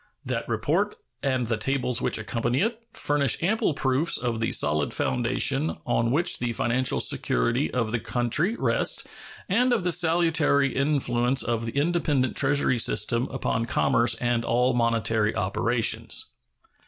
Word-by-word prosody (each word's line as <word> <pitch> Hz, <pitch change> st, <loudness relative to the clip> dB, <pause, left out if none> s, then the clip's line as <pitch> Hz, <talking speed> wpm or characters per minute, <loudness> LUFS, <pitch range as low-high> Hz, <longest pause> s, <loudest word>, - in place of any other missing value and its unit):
That -, -, -3 dB
report -, -, 0 dB, 0.3 s
and 130 Hz, -3 st, 0 dB
the 115 Hz, -1 st, -1 dB
tables 125 Hz, +2 st, -1 dB
which -, -, 0 dB
accompany 115 Hz, +3 st, -1 dB
it 230 Hz, +2 st, -2 dB
furnish 145 Hz, +1 st, 0 dB
ample 185 Hz, -4 st, +1 dB
proofs 140 Hz, +3 st, +1 dB
of 120 Hz, -2 st, -2 dB
the 115 Hz, -, 0 dB
solid 75 Hz, -1 st, 0 dB
foundation 135 Hz, +5 st, 0 dB
on 115 Hz, -1 st, 0 dB
which 155 Hz, +8 st, +1 dB
the 120 Hz, -1 st, -2 dB
financial 125 Hz, +3 st, 0 dB
security -, -, +1 dB
of 115 Hz, -3 st, -1 dB
the 120 Hz, -, -1 dB
country 125 Hz, -, -1 dB
rests -, -, +1 dB, 0.4 s
and 245 Hz, +6 st, +2 dB
of 230 Hz, -6 st, +1 dB
the 180 Hz, -, +1 dB
salutary 160 Hz, -5 st, +2 dB
influence 130 Hz, -3 st, +1 dB
of 115 Hz, -1 st, -2 dB
the 115 Hz, -, -5 dB
independent 145 Hz, -4 st, 0 dB
treasury 135 Hz, -3 st, +1 dB
system 115 Hz, +3 st, +1 dB
upon 115 Hz, -3 st, -2 dB
commerce 120 Hz, 0 st, +2 dB
and 120 Hz, -1 st, -1 dB
all 125 Hz, +2 st, +1 dB
monetary 115 Hz, -2 st, 0 dB
operations. 115 Hz, +5 st, 0 dB
125 Hz, 140 wpm, -25 LUFS, 115-145 Hz, 0.4 s, and